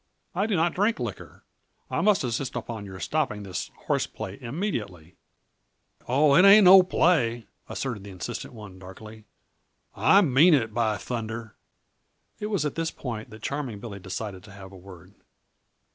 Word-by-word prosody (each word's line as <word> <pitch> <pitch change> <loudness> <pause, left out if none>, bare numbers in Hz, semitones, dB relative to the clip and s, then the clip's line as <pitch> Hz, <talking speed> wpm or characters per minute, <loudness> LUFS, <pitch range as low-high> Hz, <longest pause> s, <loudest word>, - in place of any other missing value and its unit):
"I 195 +4 0
do 215 - 0
not 170 0 +1
drink 210 +5 +1
liquor. - - -7 0.5
I - - 0
must 210 -5 +3
insist 125 +2 -3
upon 115 -3 -6
your 95 -1 -9
stopping 135 -9 -2
this 95 -2 -5 0.2
horseplay 95 +5 -3
immediately!" 115 - -5 0.9
"Oh, 140 +3 +3
it 180 - +6
ain't 200 +1 +8
no 190 +1 +10
play," 130 - +1 0.2
asserted 120 -7 -4
the 100 - -10
insistent 110 +6 -7
one 100 -4 -11
darkly. 105 +4 -12 0.7
"I 200 - +5
mean 155 +3 +5
it, 115 -5 -1
by 110 -2 0
thunder." 115 +1 -6 0.8
It 210 - -3
was 200 -8 -1
at 150 - -2
this 165 0 -2
point 115 -8 -7
that 110 - -13
Charming 140 -7 -4
Billy 100 -2 -8
decided 95 +1 -6
to 105 - -14
have 95 -1 -12
a - - -13
word. 90 -2 -14
115 Hz, 160 wpm, -26 LUFS, 100-160 Hz, 0.9 s, no